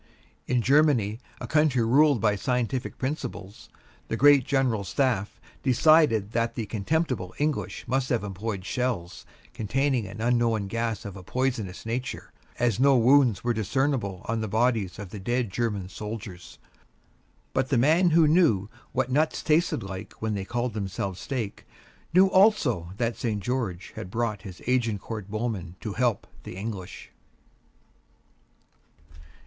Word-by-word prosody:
In 125 Hz, -2 st, +1 dB
Germany, 130 Hz, -7 st, +3 dB, 0.2 s
a -, -, -5 dB
country 150 Hz, -6 st, +2 dB
ruled 140 Hz, +2 st, +4 dB
by 105 Hz, -2 st, +3 dB
scientific 125 Hz, +3 st, -2 dB
principles, 125 Hz, -8 st, -5 dB, 0.4 s
the 115 Hz, -, -2 dB
Great 145 Hz, -2 st, +6 dB
General 130 Hz, -7 st, +1 dB
Staff 105 Hz, +1 st, -1 dB, 0.2 s
decided 130 Hz, -6 st, +4 dB
that 115 Hz, 0 st, -1 dB
the 115 Hz, -, -3 dB
contemptible 110 Hz, -, -2 dB
English 150 Hz, -3 st, -2 dB
must 130 Hz, +1 st, 0 dB
have 120 Hz, -4 st, 0 dB
employed 100 Hz, 0 st, -4 dB
shells 115 Hz, -7 st, -3 dB, 0.3 s
containing 125 Hz, +1 st, 0 dB
an 100 Hz, +3 st, -9 dB
unknown 115 Hz, -2 st, +1 dB
gas 115 Hz, 0 st, -3 dB
of 100 Hz, -2 st, -7 dB
a 95 Hz, -, -9 dB
poisonous 115 Hz, -3 st, -2 dB
nature, 120 Hz, +3 st, -4 dB, 0.2 s
as 120 Hz, -4 st, +1 dB
no 135 Hz, 0 st, +5 dB
wounds 125 Hz, -3 st, +4 dB
were 120 Hz, 0 st, +1 dB
discernible 110 Hz, -3 st, -1 dB
on 115 Hz, 0 st, -1 dB
the 110 Hz, -, -2 dB
bodies 110 Hz, -3 st, 0 dB
of 100 Hz, -3 st, -8 dB
the 105 Hz, -, -7 dB
dead 120 Hz, +2 st, -1 dB
German 105 Hz, -4 st, -2 dB
soldiers. 105 Hz, -2 st, -8 dB, 1.0 s
But 130 Hz, -, 0 dB
the 135 Hz, -, +2 dB
man 160 Hz, +8 st, +4 dB
who 165 Hz, -1 st, +5 dB
knew 150 Hz, -, +3 dB, 0.2 s
what 130 Hz, 0 st, 0 dB
nuts 155 Hz, +4 st, +1 dB
tasted 160 Hz, -, +2 dB
like 95 Hz, +1 st, -7 dB
when 110 Hz, -1 st, -3 dB
they 100 Hz, -2 st, -3 dB
called 120 Hz, +2 st, -2 dB
themselves 95 Hz, -2 st, -4 dB
steak 120 Hz, -6 st, -4 dB, 0.5 s
knew 185 Hz, +3 st, +6 dB
also 185 Hz, -, +3 dB
that 115 Hz, 0 st, -1 dB
St. 110 Hz, -4 st, -2 dB
George 100 Hz, -5 st, -3 dB
had 90 Hz, -, -6 dB
brought 110 Hz, -2 st, -2 dB
his 95 Hz, -3 st, -10 dB
Agincourt 115 Hz, -4 st, -1 dB
Bowmen 105 Hz, -5 st, -3 dB
to 105 Hz, -, -4 dB
help 120 Hz, -3 st, 0 dB, 0.2 s
the -, -, -9 dB
English. 100 Hz, -2 st, -7 dB
115 Hz, 145 wpm, -26 LUFS, 100-130 Hz, 1.0 s, Great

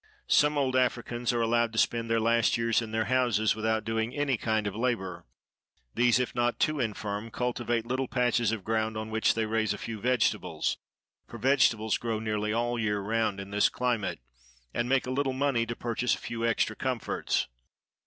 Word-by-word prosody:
Some 150 Hz, 0 st, +3 dB
old 130 Hz, -2 st, +1 dB
Africans 120 Hz, -1 st, 0 dB
are 120 Hz, -1 st, 0 dB
allowed 120 Hz, 0 st, +2 dB
to -, -, -6 dB
spend 115 Hz, 0 st, +1 dB
their 115 Hz, 0 st, +2 dB
last 115 Hz, +1 st, +2 dB
years 115 Hz, 0 st, +2 dB
in 115 Hz, -, -5 dB
their 110 Hz, 0 st, 0 dB
houses, 120 Hz, -5 st, +2 dB
without 110 Hz, 0 st, 0 dB
doing 115 Hz, +1 st, -2 dB
any 145 Hz, -2 st, +1 dB
kind 110 Hz, -1 st, -1 dB
of 100 Hz, -, -3 dB
labor; 110 Hz, -7 st, -2 dB, 0.7 s
these, 120 Hz, 0 st, +4 dB
if 125 Hz, -, -1 dB
not 120 Hz, 0 st, 0 dB
too 155 Hz, -1 st, +1 dB
infirm, 105 Hz, -2 st, -3 dB
cultivate 120 Hz, -1 st, -1 dB
little 130 Hz, +2 st, -1 dB
patches 120 Hz, -3 st, +1 dB
of 110 Hz, -4 st, -3 dB
ground, 110 Hz, 0 st, -1 dB
on 110 Hz, 0 st, -5 dB
which 110 Hz, 0 st, +2 dB
they 115 Hz, -1 st, 0 dB
raise 110 Hz, -1 st, 0 dB
a -, -, -8 dB
few 110 Hz, -1 st, -6 dB
vegetables,—for 125 Hz, -1 st, -2 dB
vegetables 115 Hz, -3 st, +2 dB
grow 115 Hz, -2 st, -2 dB
nearly 105 Hz, -1 st, -1 dB
all 120 Hz, +2 st, 0 dB
the -, -, -1 dB
year 105 Hz, -1 st, 0 dB
round 105 Hz, 0 st, -1 dB
in 100 Hz, 0 st, -8 dB
this 105 Hz, 0 st, +3 dB
climate,—and 60 Hz, -, -4 dB
make 135 Hz, 0 st, +2 dB
a 125 Hz, -, -3 dB
little 135 Hz, 0 st, 0 dB
money 130 Hz, -4 st, +1 dB
to 120 Hz, -, -3 dB
purchase 120 Hz, 0 st, 0 dB
a -, -, -11 dB
few 115 Hz, -1 st, -5 dB
extra 115 Hz, -1 st, +1 dB
comforts. 130 Hz, -2 st, -1 dB
115 Hz, 185 wpm, -28 LUFS, 110-120 Hz, 0.7 s, these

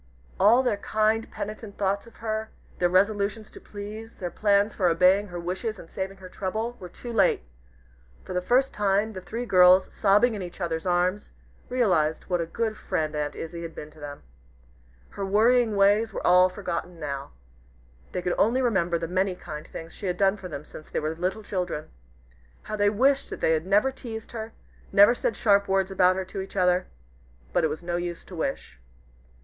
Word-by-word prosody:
All 230 Hz, +6 st, +6 dB
their 245 Hz, -5 st, +1 dB
kind, 215 Hz, +2 st, 0 dB
penitent 215 Hz, 0 st, -7 dB
thoughts 200 Hz, +2 st, -1 dB
of 230 Hz, -, -16 dB
her; 220 Hz, 0 st, -3 dB, 0.3 s
their 175 Hz, -, +3 dB
resolutions 205 Hz, +3 st, +1 dB
to -, -, -12 dB
please 215 Hz, +2 st, -8 dB
their 175 Hz, -2 st, -5 dB
plans 205 Hz, +2 st, +2 dB
for 185 Hz, -, +1 dB
obeying 185 Hz, +4 st, +4 dB
her 175 Hz, -2 st, -6 dB
wishes 190 Hz, +6 st, -3 dB
and 165 Hz, -, -13 dB
saving 195 Hz, 0 st, -4 dB
her 190 Hz, -1 st, -11 dB
trouble, 220 Hz, +6 st, -3 dB
were 180 Hz, -, -8 dB
too 240 Hz, +6 st, -8 dB
late! 195 Hz, -, +3 dB, 0.8 s
For -, -, -6 dB
the 180 Hz, -, 0 dB
first 255 Hz, +7 st, +2 dB
time, 205 Hz, +2 st, +1 dB
the 185 Hz, -, -7 dB
three 230 Hz, +6 st, -5 dB
girls, 185 Hz, -2 st, +6 dB
sobbing 210 Hz, +4 st, +4 dB
in 205 Hz, -, -4 dB
each 175 Hz, 0 st, -8 dB
other's 170 Hz, 0 st, -2 dB
arms, 180 Hz, +3 st, 0 dB, 0.4 s
realized 180 Hz, -11 st, +1 dB
what 175 Hz, -2 st, -1 dB
a 165 Hz, -, -3 dB
good 220 Hz, +4 st, -2 dB
friend 155 Hz, -1 st, -2 dB
Aunt 150 Hz, -1 st, -2 dB
Izzie 170 Hz, +1 st, -6 dB
had 165 Hz, -1 st, -7 dB
been 150 Hz, -, -8 dB
to 155 Hz, -, -18 dB
them. 145 Hz, -1 st, -8 dB, 0.9 s
Her 200 Hz, -, -5 dB
worrying 220 Hz, +3 st, +3 dB
ways 205 Hz, +2 st, +3 dB
were -, -, -4 dB
all 180 Hz, +1 st, +6 dB
forgotten 180 Hz, -2 st, -5 dB
now. 140 Hz, -, -5 dB, 0.8 s
They 180 Hz, -, -3 dB
could 180 Hz, -, 0 dB
only 250 Hz, +5 st, +3 dB
remember 185 Hz, -8 st, +1 dB
the 165 Hz, 0 st, -4 dB
many 185 Hz, +2 st, 0 dB
kind 155 Hz, -4 st, -8 dB
things 165 Hz, 0 st, -9 dB
she 200 Hz, -, -6 dB
had 180 Hz, -1 st, -1 dB
done 195 Hz, +1 st, +3 dB
for 195 Hz, -3 st, -8 dB
them 150 Hz, -3 st, -7 dB
since 155 Hz, -, -12 dB
they -, -, -1 dB
were 155 Hz, +1 st, -2 dB
little 185 Hz, +6 st, -3 dB
children. 180 Hz, -6 st, -3 dB, 0.7 s
How 215 Hz, -, -4 dB
they 205 Hz, -1 st, +3 dB
wished 270 Hz, +6 st, +2 dB
that -, -, -6 dB
they -, -, +2 dB
had 160 Hz, +2 st, 0 dB
never 205 Hz, +7 st, +3 dB
teased 225 Hz, -4 st, -8 dB
her, 220 Hz, -1 st, -6 dB, 0.4 s
never 205 Hz, +4 st, +7 dB
said 235 Hz, -2 st, -1 dB
sharp 200 Hz, -2 st, +3 dB
words 195 Hz, 0 st, +1 dB
about 185 Hz, -1 st, +4 dB
her 190 Hz, 0 st, -3 dB
to 190 Hz, +1 st, -5 dB
each 190 Hz, -, -9 dB
other! 180 Hz, -1 st, +2 dB, 0.7 s
But -, -, +2 dB
it 160 Hz, -, +3 dB
was 155 Hz, +3 st, -5 dB
no 175 Hz, 0 st, -2 dB
use 175 Hz, -1 st, -4 dB
to 185 Hz, -, -11 dB
wish. 135 Hz, -, -4 dB
195 Hz, 200 wpm, -26 LUFS, 175-215 Hz, 0.9 s, never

